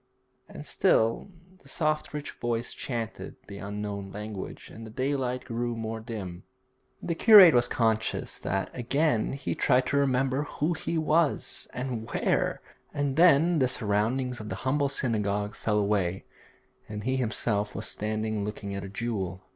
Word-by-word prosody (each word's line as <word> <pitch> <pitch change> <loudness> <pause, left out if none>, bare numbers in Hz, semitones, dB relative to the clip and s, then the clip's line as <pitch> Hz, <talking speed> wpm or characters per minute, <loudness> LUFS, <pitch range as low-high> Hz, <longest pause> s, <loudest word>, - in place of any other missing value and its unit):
And - - -9
still 115 - +2 0.3
the - - -16
soft 155 -2 -1
rich 150 -1 -5
voice 120 0 -3
chanted 115 -4 -5
the 100 -1 -9
unknown 100 -1 -5
language, 105 -1 -7
and 115 - -10
the 110 - -8
daylight 130 +1 -2
grew 120 -1 -2
more 115 0 -4
dim. 100 -6 -7 0.6
The 170 - -1
curate 195 -2 +9
was 120 0 +4
conscious 110 -2 0
that 95 +1 -2
again 130 0 +1
he 140 - -3
tried 125 -1 +3
to 140 - 0
remember 135 0 +2
who 150 +3 -1
he 165 +1 -3
was, 155 0 +1
and 120 -3 -4
where; - - 0 0.3
and 145 -2 -1
then 165 0 +5
the 130 - +4
surroundings 120 +3 0
of 105 -1 -7
the - - -3
humble 140 +1 +2
synagogue 105 -6 -1
fell 105 -2 -1
away, 100 -3 0 0.6
and 105 -1 -5
he 130 +2 0
himself 110 -4 -1
was - - -4
standing 110 0 -2
looking 100 -1 -5
at 100 - -4
a 95 - -6
jewel. 95 -4 -3
115 Hz, 155 wpm, -28 LUFS, 105-135 Hz, 0.6 s, curate